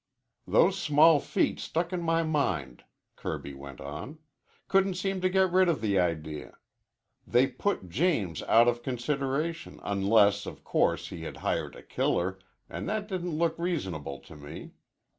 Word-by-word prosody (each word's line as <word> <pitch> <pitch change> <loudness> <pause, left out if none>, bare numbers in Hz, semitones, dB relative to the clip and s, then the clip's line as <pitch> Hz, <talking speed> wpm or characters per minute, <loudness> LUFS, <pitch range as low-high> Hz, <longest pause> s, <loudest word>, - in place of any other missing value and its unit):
"Those 195 +2 +4
small 155 -1 +6
feet - - 0
stuck 170 +2 -2
in 180 - -1
my 165 0 +2
mind," 150 - -1 0.3
Kirby 70 - -5
went 70 -1 -10
on. 75 - -7 0.5
"Couldn't 195 -1 +3
seem 190 +1 -2
to 185 - +2
get 190 -1 +3
rid 185 0 +4
of 160 - +1
the 100 -3 +1
idea. 80 -4 -2 0.7
They 125 +2 +4
put 135 - -2
James 110 - 0
out 115 +1 +6
of 120 0 +1
consideration, 140 +6 -2
unless, 100 0 +3
of - - -8
course, - - +1
he 85 - -7
had 80 - -6
hired - - -1
a - - -12
killer, 95 +2 -1 0.3
an' - - -6
that 215 -1 -2
didn't 180 -5 -3
look 165 0 0
reasonable 95 - -3
to 80 - -14
me. 75 0 -9
140 Hz, 155 wpm, -29 LUFS, -, 0.7 s, small